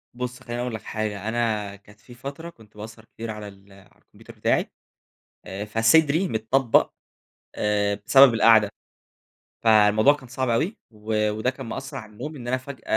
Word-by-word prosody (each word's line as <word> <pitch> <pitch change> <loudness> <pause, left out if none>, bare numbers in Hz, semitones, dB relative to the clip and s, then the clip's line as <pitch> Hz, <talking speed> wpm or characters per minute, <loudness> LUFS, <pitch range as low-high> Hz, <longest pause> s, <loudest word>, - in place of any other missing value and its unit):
بُص 125 0 -5
خليني 120 -2 -5
أقُول 125 -2 -3
لك 110 - -7
حاجة، 105 -2 -4
أنا 110 -3 -1
كانت 105 +1 -20
في 120 - -16
فترة 140 +7 -8
كنت 110 -8 -20
باسهر 110 +1 -10
كتير 115 0 -7
على 105 -1 -8
ال 100 0 -16
على 95 -1 -20
الكمبيوتر - - -17
بتاعي، - - 0 0.7
آآ 100 +2 -6
فصدري 140 - +3
متطبق 115 +2 +2 0.7
آآ 105 -1 0
بسبب 135 0 +7
القعدة. 110 -2 +5 0.9
فالموضوع 110 +3 +5
كان 140 -3 -11
صعب 130 +1 -3
أوي، 160 - 0
و 105 0 -1
وده 110 +4 -1
كان 135 0 -8
مأثَّر 135 +4 -6
على 110 -2 -10
النوم 150 +9 -7
إن 120 -3 -9
أنا 130 +1 +1
فجأة 130 -2 -10
115 Hz, 165 wpm, -24 LUFS, 105-130 Hz, 0.9 s, بسبب